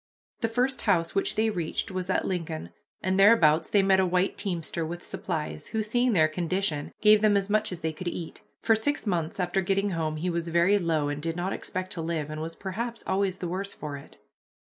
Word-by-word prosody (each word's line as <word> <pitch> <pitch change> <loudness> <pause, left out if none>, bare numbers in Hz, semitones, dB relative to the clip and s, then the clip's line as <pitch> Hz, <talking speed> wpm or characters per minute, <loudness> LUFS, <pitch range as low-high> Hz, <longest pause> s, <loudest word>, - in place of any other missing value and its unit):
The 230 - +1
first 250 +3 0
house 165 -2 +1
which 195 +1 +1
they 220 +1 +2
reached 175 -1 -2
was 185 0 -4
at 185 - +1
Lincoln, 165 -4 -3 0.3
and 185 +1 +1
thereabouts 170 -7 +5
they 200 -2 +4
met 190 -1 +4
a 190 - +4
white 180 +2 +1
teamster 170 -4 -3
with 175 +2 -5
supplies, 155 -4 -4
who, 220 -1 -1
seeing 240 +3 +1
their 160 -5 +5
condition, 165 -1 -2
gave 210 0 +6
them 210 -1 +4
as 200 +1 -1
much 215 0 +2
as 180 -2 -6
they 160 0 -1
could 175 +3 -7
eat. 170 -1 -5 0.2
For 225 - +5
six 290 +6 -1
months 175 -1 -1
after 180 +1 +1
getting 195 +2 +1
home 160 -3 -1
he 175 +3 -1
was 170 0 -2
very 170 +5 +3
low 160 -5 0
and 145 0 -3
did 165 +1 -2
not 180 +2 -2
expect 185 -1 -4
to 165 - -4
live, 160 -2 -2
and 155 0 -5
was 165 +1 -5
perhaps 230 +5 -4
always 190 -1 0
the 180 - -4
worse 195 +3 -3
for 150 -2 -6
it. 140 - -12
185 Hz, 220 wpm, -27 LUFS, 165-200 Hz, 0.3 s, gave